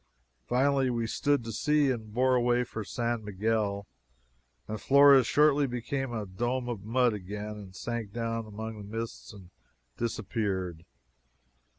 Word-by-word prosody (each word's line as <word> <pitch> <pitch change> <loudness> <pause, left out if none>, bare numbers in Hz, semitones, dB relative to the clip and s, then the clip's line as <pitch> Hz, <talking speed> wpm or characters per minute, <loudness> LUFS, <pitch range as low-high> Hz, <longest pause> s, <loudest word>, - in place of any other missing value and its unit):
Finally 135 +1 +2
we 120 -2 -1
stood 140 +3 +1
to 115 - -5
sea 150 +4 +2
and 110 -4 -5
bore 130 +3 +2
away 120 0 +3
for 110 -2 -6
San 115 +2 -2
Miguel, 105 0 -1 0.8
and 110 0 -5
Flores 140 -3 +7
shortly 145 -1 +4
became 125 +2 -3
a 110 -3 -3
dome 120 +6 -2
of 115 -5 -4
mud 120 +2 +2
again 105 +2 -5
and 95 -3 -11
sank 120 -3 -4
down 115 0 -3
among 110 +1 -6
the 105 +2 -7
mists, 115 0 -5
and 95 -4 -14 0.5
disappeared. 95 -7 -2
115 Hz, 145 wpm, -29 LUFS, 105-125 Hz, 0.8 s, Flores